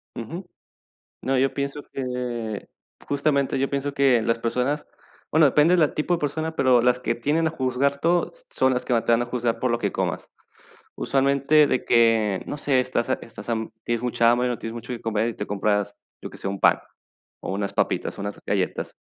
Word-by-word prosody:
Ujú. 165 - -6 0.8
No, 135 0 0
yo 135 +1 +2
pienso 140 +1 -3
que 125 -5 -4 0.4
Justamente, 140 -2 +1
yo 135 - 0
pienso 140 0 -2
que 135 -4 +4
las 115 +1 0
personas, 125 +5 -1 0.4
bueno 155 0 +5
depende 150 +5 +4
de - - +4
la 155 -3 +3
tipo 155 +3 0
de - - +2
persona, 160 +2 -2
pero 125 -2 +4
las 125 0 +3
que 115 - 0
tienden 150 +8 0
a - - +1
juzgar 140 -1 0
todo, 175 +3 +1
s - - -18
son 130 0 +2
las 125 - -2
que - - 0
más 115 -2 +2
te 115 - +1
van 115 +1 +4
a - - -1
juzgar 120 -1 -1
por 125 - 0
lo 120 - +1
que - - -1
comas. - - -3 0.7
Usualmente 140 +2 +3
de 130 - 0
que, 115 -4 +3
no 145 - -4
sé, 140 -3 +2
estás 130 0 -1
ha - - +4
estás 115 - -11
ham 110 -1 -2
tienes 120 0 -1
mucha 115 -1 +3
hambre, 125 +1 +2
no 120 - -1
tienes 115 - -6
mucho 120 +2 -7
qué 115 - -8
comer 110 0 0
y 115 - -4
te 105 - -5
compras, 105 0 0 0.3
yo - - -6
que - - -12
sé, 95 - -4
un 100 - -4
pan - - +5 0.6
o - - -4
unas 100 0 -3
papitas - - -1
o - - -5
unas 100 0 -5
galletas. 95 -2 -2
125 Hz, 215 wpm, -24 LUFS, 115-140 Hz, 0.8 s, bueno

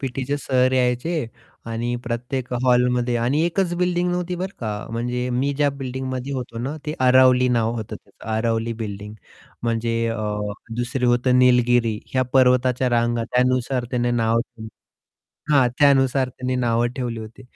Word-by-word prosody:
पीटीचे 135 +1 -2
sir 130 -2 +1
यायचे 125 +4 0 0.4
आणि 115 +1 -2
प्रत्येक 125 +2 -4
हॉलमध्ये 125 -1 +2
आणि 125 +6 +1
एकच 175 +1 0
बिल्डिंग 180 0 0
नव्हती 180 0 -2
बरं 185 +2 -5
का, 105 -2 -4
म्हणजे 125 +2 -2
मी 130 +3 0
ज्या 145 0 +2
बिल्डिंगमध्ये 130 0 -5
होतो 125 -3 -5
ना 135 +6 -3
ते 150 - -2
अरावली 130 0 +5
नाव 115 -2 +1
होतं 110 -2 -5
त्याचं - - -16
अरावली 115 0 0
बिल्डिंग. 105 0 -6 0.5
म्हणजे 115 0 -1
अ, 115 - -3 0.6
दुसरी 125 +1 -2
होतं 125 +1 +3
निलगिरी 120 -3 +3 0.2
या 130 - +3
पर्वताच्या 125 -1 +3
रांगा 120 -1 +1
त्यानुसार 125 +1 0
त्याने 120 -1 0
नाव 115 -1 +1
ठेवली. 110 -2 -9 0.8
हां, 135 -4 +5
त्यानुसार 135 -2 +4
त्यांनी 130 0 -4
नावं 120 -1 +1
ठेवली 120 -3 -3
होती. 110 +4 -11
125 Hz, 145 wpm, -22 LUFS, 120-130 Hz, 0.8 s, अरावली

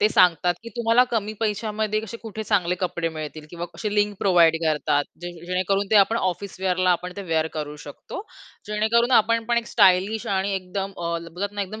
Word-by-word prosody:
ते 210 - +5
सांगतात 180 -3 +4
की 230 - -8
तुम्हाला 235 +1 +4
कमी 215 -3 -1
पैशामध्ये 215 0 -1
असे 225 - -7
कुठे 220 -1 -7
चांगले 185 -5 +1
कपडे 170 -2 -1
मिळतील 155 -1 -7
किंवा 175 0 -5
कसे 205 +5 -3
लिंक 205 -1 +1
प्रोव्हाईड 170 -4 +4
करतात, 150 -2 +1 0.2
जेणे 175 -1 -8
जेणेकरून 185 +2 0
ते 215 - +5
आपण 205 +3 +5
ऑफिस 190 -1 -2
वेअर 185 -2 +1
ला 180 - +5
आपण 180 +1 -1
ते 200 - -5
वेअर 160 -3 0
करू 150 -1 -4
शकतो. 145 - -8 0.4
जेणेकरून 220 +3 +2
आपण 230 +1 +1
पण 235 - +3
एक 235 - -5
स्टायलिश 200 0 +3
आणि 195 0 0
एकदम 190 +1 -4
अ, 170 -1 -3 0.2
बोलतात 200 +4 -4
ना, 205 - -1
एकदम 215 +3 -7
195 Hz, 200 wpm, -24 LUFS, 175-215 Hz, 0.4 s, ते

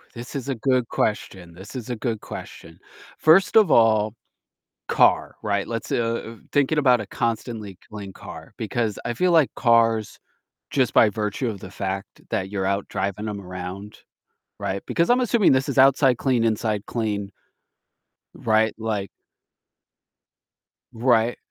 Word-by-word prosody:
This 120 +4 -8
is 140 0 -4
a 135 - -1
good 125 0 +1
question, 95 -5 -2
this 95 +8 -12
is 125 -1 -6
a - - -1
good 110 -2 -3
question. - - -10 0.4
First 170 +7 +5
of 215 -3 +6
all, 110 -2 +4 0.7
car, - - +3
right? 100 -1 -1
Let's, 115 -1 -5
uh 115 0 0
uh, 115 +1 -9 0.2
thinking 145 +2 +2
about 125 -4 +4
a - - -6
constantly 110 -4 -3
clean 100 -2 -7
car, - - -11
because 110 -1 -2
I 120 - -1
feel 180 +9 +1
like 160 -5 +4
cars, 115 -3 +2 0.5
just 130 -5 +1
by 110 - +6
virtue 105 +4 -2
of 100 -4 -5
the 95 - -9
fact 95 -1 -5
that 95 +1 -2
you're 95 -2 -2
out 100 0 -1
driving 100 +3 -3
'em 100 - -5
around, 90 +3 -8 0.6
right? 95 +1 -3
Because 170 +7 +1
I'm 250 - +4
assuming 235 -4 +3
this 135 +2 +2
is 140 - -3
outside 135 -1 +5
clean, 125 -4 +1
inside 110 -2 0
clean 105 -4 -3 1.0
Right? 110 0 +1
Like 110 -3 -3 1.8
Right, 115 0 +2
115 Hz, 150 wpm, -23 LUFS, 100-125 Hz, 1.8 s, of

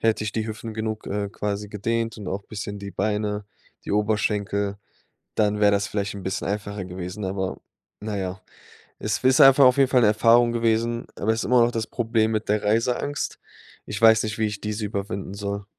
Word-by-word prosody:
Hätte 110 -1 +1
ich 105 - -3
die 110 - -1
Hüften 110 +1 -6
genug, 110 0 -4
äh, 100 0 -2
quasi 105 0 -4
gedehnt 115 +2 -2
und 105 - -8
auch 95 +2 -3
bisschen 100 0 -6
die 100 0 -6
Beine, 105 +1 -1 0.4
die - - -3
Oberschenkel, 100 -1 0 0.6
dann 105 -1 +1
wär 105 -1 +5
das 100 -1 +2
vielleicht 100 -1 -3
'n 100 - -8
bisschen 95 0 -3
einfacher 100 0 -3
gewesen, 90 +2 -6
aber 95 0 -3 0.4
na 105 -1 -4
ja. 95 +1 -4 0.6
Es 105 -1 -1
ist 130 0 +6
einfach 135 0 +8
auf 125 0 +6
jeden 135 -2 +4
Fall 130 - +4
'ne 115 - +5
Erfahrung 115 +2 +4
gewesen, 115 0 0
aber 110 +2 +2
ist 110 - -2
immer 125 0 +4
noch 120 +1 +3
das 115 -2 -2
Problem 115 -2 0
mit 110 0 -2
der 105 0 +1
Reiseangst. 120 +7 0 0.5
Ich 100 - -5
weiß 110 -1 +6
nicht, 110 -1 -3
wie 110 - +2
ich 105 -1 -6
diese 105 0 -3
überwinden 100 -1 -4
soll. 100 0 -4
105 Hz, 200 wpm, -24 LUFS, 100-115 Hz, 0.6 s, einfach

